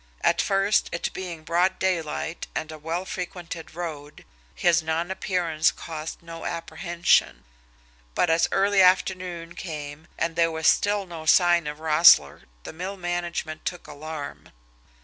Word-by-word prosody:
At - - +3
first, 195 +1 +2
it 170 - -3
being 175 -4 -6
broad 175 +3 +1
daylight 170 -2 -2
and 160 - -3
a 155 - -9
well 165 +4 -3
frequented 170 -3 -6
road, 155 -4 -7 0.3
his 175 -1 +3
nonappearance 165 0 0
caused 160 0 -7
no 165 0 -9
apprehension; 170 +1 0 0.7
but - - +3
as 165 0 +3
early 195 +1 +3
afternoon 180 -2 +1
came 150 -2 -7
and 165 - -1
there 165 0 +3
was 160 0 -4
still 205 +2 +3
no 165 -3 -9
sign 175 -2 +5
of 150 0 -5
Roessle 155 - +6 0.2
the - - -8
mill 185 +4 -5
management 175 -3 -3
took 175 - -4
alarm. 150 -1 -8
170 Hz, 135 wpm, -25 LUFS, 160-180 Hz, 0.7 s, Roessle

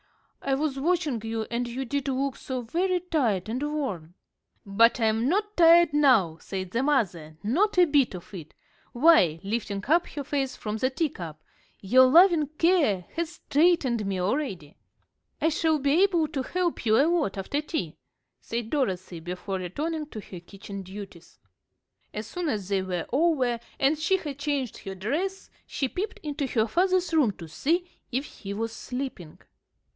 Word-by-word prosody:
I 270 -1 0
was 275 -1 -2
watching 310 -6 0
you, 225 0 -2
and 240 +1 -1
you 255 +3 -4
did 280 +2 -2
look 270 0 -1
so 255 -2 -5
very 360 +10 0
tired 245 - 0
and 240 +4 -3
worn." 260 - -3 0.5
"But 225 +5 +4
I'm 225 +2 +2
not 415 +4 0
tired 340 -2 +6
now," 225 - +4
said 190 -2 -5
the 235 - 0
mother, 185 - 0
"not 360 - +1
a 360 - +7
bit 285 - +2
of 180 +3 -11
it. 160 -5 -9 0.4
Why," 240 - +5
lifting 205 -1 -3
up 335 +4 +3
her 285 - -6
face 275 -1 -2
from 215 0 -4
the 255 +4 +1
teacup, 180 - -4 0.4
"your 255 +7 +5
loving 335 +1 +6
care 305 - +3
has 335 0 -2
strengthened 285 -7 +2
me 190 -1 -2
already." 185 - -2 0.6
"I 320 - +2
shall 320 0 +1
be 285 +4 +2
able 350 -5 +3
to 280 -3 -2
help 355 +5 -2
you 220 +1 +5
a 280 - +5
lot 325 - 0
after 280 +10 -2
tea," 300 - -4 0.5
said 230 -1 -4
Dorothy, 185 - -1
before 180 +3 -5
returning 300 - -3
to 225 - -8
her 185 -3 -9
kitchen 195 +2 -9
duties. 190 -2 -11 0.7
As 215 +1 -5
soon 345 +8 -3
as 205 -8 -2
they 195 -1 +1
were 180 -2 -3
over, 265 -6 +2 0.2
and 280 +3 +3
she 380 +5 +2
had 290 -6 -7
changed 285 -5 -2
her 195 -1 -7
dress, 320 - -3 0.2
she 270 - -2
peeped 420 - -4
into 290 -2 -2
her 220 -4 +1
father's 365 - +1
room 300 -8 +4
to 170 -3 -10
see 330 - 0 0.3
if 260 +4 -1
he 200 -8 -8
was 225 +1 -3
sleeping. 250 - -6
260 Hz, 170 wpm, -26 LUFS, 200-315 Hz, 0.7 s, a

